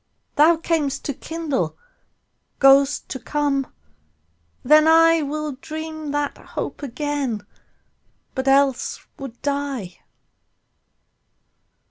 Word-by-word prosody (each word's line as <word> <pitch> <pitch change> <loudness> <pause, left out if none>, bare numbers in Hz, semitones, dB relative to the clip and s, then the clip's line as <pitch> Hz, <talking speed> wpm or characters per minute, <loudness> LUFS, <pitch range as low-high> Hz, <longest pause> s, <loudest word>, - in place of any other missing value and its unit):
Thou 320 +3 +5
cam'st 320 -4 -1
to 285 - -1
kindle, 315 0 -3 0.8
goest 275 +1 +5
to 265 - -5
come: 285 -1 -1 0.9
then 305 +1 +6
IWill 305 -3 +3
dream 315 -1 -6
that 290 0 -2
hope - - -6
again, 275 -5 -3 0.9
but 260 0 -3
else 270 -1 +2
would 265 -4 -8
die. 280 -10 -3
285 Hz, 85 wpm, -22 LUFS, 270-310 Hz, 0.9 s, then